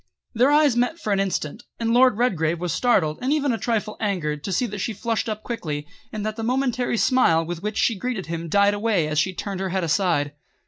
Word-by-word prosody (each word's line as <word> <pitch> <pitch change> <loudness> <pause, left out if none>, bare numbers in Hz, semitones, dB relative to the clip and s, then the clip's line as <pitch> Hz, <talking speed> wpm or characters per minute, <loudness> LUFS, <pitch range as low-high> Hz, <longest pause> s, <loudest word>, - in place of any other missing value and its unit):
Their 250 +3 +4
eyes 295 -3 +4
met 245 +7 +1
for 210 -10 -1
an 195 - +1
instant, 190 -1 -2 0.2
and 230 0 0
Lord 250 -2 +5
Redgrave 170 -9 +1
was 175 -3 -2
startled 180 -11 +2
and 260 +2 0
even 290 -4 +1
a - - -1
trifle 220 -3 -2
angered 155 -8 -2
to 195 - -4
see 190 +7 +1
that 210 -3 -5
she 225 - -2
flushed 225 +2 -2
up 215 0 -4
quickly, 150 -11 -4 0.3
and 215 -1 -4
that 215 +1 -3
the 225 - -4
momentary 250 -1 0
smile 170 -11 +3
with 170 0 -5
which 210 +1 -3
she 225 -5 +1
greeted 240 -4 -3
him 165 0 -5
died 200 +3 +4
away 205 -6 +1
as 155 0 0
she 190 - +1
turned 195 +1 -4
her 190 0 -2
head 185 0 -1
aside. 165 -4 +1
205 Hz, 230 wpm, -23 LUFS, 170-240 Hz, 0.3 s, Lord